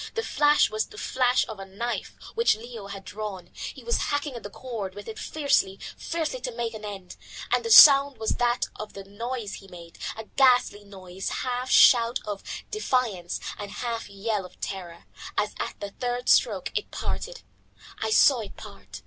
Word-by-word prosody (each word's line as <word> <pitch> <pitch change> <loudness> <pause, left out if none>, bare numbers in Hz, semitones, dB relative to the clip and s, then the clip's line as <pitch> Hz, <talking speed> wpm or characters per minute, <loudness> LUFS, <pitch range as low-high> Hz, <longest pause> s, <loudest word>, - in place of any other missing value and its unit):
The 455 - -1
flash 295 - +3
was 215 0 -1
the 420 - -14
flash 255 -8 +1
of 215 -3 -8
a 195 - -7
knife 235 +5 -4 0.2
which 465 - +3
Leo 225 -2 -9
had 195 -1 -8
drawn. 200 -5 -7
He - - -8
was 470 - +1
hacking 290 -1 -1
at 235 - -7
the 205 - -7
cord 210 -5 -6
with 205 0 -9
it 220 - -7
fiercely, 280 -10 +1 0.2
fiercely, 335 +9 -3
to - - -3
make 230 -1 -2
an 215 -1 -8
end. 195 -3 -7 0.4
And - - +2
the 460 - -3
sound 280 - +9
was 220 - -1
that 240 0 +1
of 215 - -7
the 195 - -8
noise 220 +2 -5
he 195 - -15
made, 170 -2 -13 0.2
a 220 - -5
ghastly 245 -4 +3
noise, 190 -2 -7
half 250 0 -3
shout 235 -2 +6
of 205 -2 -4 0.3
defiance 245 - -1 0.2
and 205 - -5
half 230 +2 -4
yell 200 +1 -2
of 180 - -14
terror, 175 -3 -6 0.3
as 210 - 0
at - - -4
the 200 -1 -6
third 245 +2 -3
stroke - - +3
it - - -2
parted. - - -5 0.6
I 220 - -1
saw 240 +4 +5
it 210 -3 -8
part. 100 +1 -11
220 Hz, 185 wpm, -26 LUFS, 195-255 Hz, 0.6 s, sound